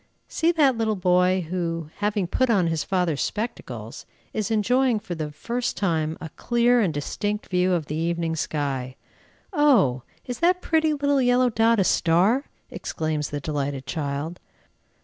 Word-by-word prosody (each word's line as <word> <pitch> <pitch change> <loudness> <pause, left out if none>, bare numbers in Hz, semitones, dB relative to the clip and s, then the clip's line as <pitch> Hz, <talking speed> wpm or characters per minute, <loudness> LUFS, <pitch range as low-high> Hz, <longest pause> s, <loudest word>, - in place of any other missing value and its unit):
See 330 +1 +1
that 285 -6 +4
little 220 -1 +1
boy, 180 -1 +2
who, 165 -3 -3
having 205 -2 0
put 255 +9 0
on 200 -6 +3
his 165 -2 0
father's 180 -6 0
spectacles, 220 +3 -5 0.3
is 215 0 -2
enjoying 235 +2 +2
for 185 - -6
the 155 -3 -4
first 235 +11 -3
time 160 -5 0
a 160 - -7
clear 240 +6 +2
and 190 -6 +1
distinct 205 +8 -3
view 180 0 +2
of 165 -4 0
the 150 +2 -4
evening 165 0 -1
sky. 140 -4 -3 0.6
"Oh! 240 - +4 0.2
is 245 -1 -5
that 360 +2 +3
pretty 315 -3 +1
little 285 -1 +1
yellow 245 0 +3
dot 225 0 +3
a - - +4
star?" 185 - +3 0.3
exclaims 155 -2 -3
the 145 - -3
delighted 140 -2 -3
child. 145 +3 -4
185 Hz, 155 wpm, -24 LUFS, 160-240 Hz, 0.6 s, that